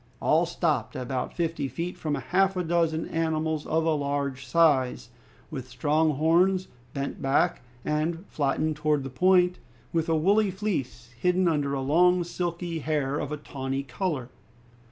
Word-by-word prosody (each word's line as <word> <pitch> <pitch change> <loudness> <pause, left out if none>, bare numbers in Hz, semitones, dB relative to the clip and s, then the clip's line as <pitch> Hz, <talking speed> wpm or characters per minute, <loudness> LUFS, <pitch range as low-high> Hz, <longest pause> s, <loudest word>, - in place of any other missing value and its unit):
All - - +3
stopped - - -1
about 125 0 -3
fifty 165 -5 -1
feet 170 +7 -4
from 150 -2 -2
half 190 +4 +1
a 180 - 0
dozen 165 -1 0
animals 160 -1 -1
of 160 +1 +1
a 165 - +3
large 140 -2 -2
size, 140 -8 +2 0.4
with 130 -4 -6
strong 155 +3 +1
horns 180 +5 +3 0.3
bent 140 0 -4
back 135 +1 +2 0.2
and 165 +4 -1
flattened 150 +2 -1
towards 150 -2 +1
the 135 - -6
point, 180 +4 +3 0.3
with 165 -1 0
a 165 - +3
woolly 200 +6 +3
fleece, 165 - -4
hidden 180 +3 +2
under 145 -4 0
long 175 +7 +3
silky 170 -1 -3
hair 145 -2 -1
of 145 - -4
a 150 - -2
tawny 135 -2 -4
color. 135 -1 -3
155 Hz, 150 wpm, -27 LUFS, 140-175 Hz, 0.4 s, All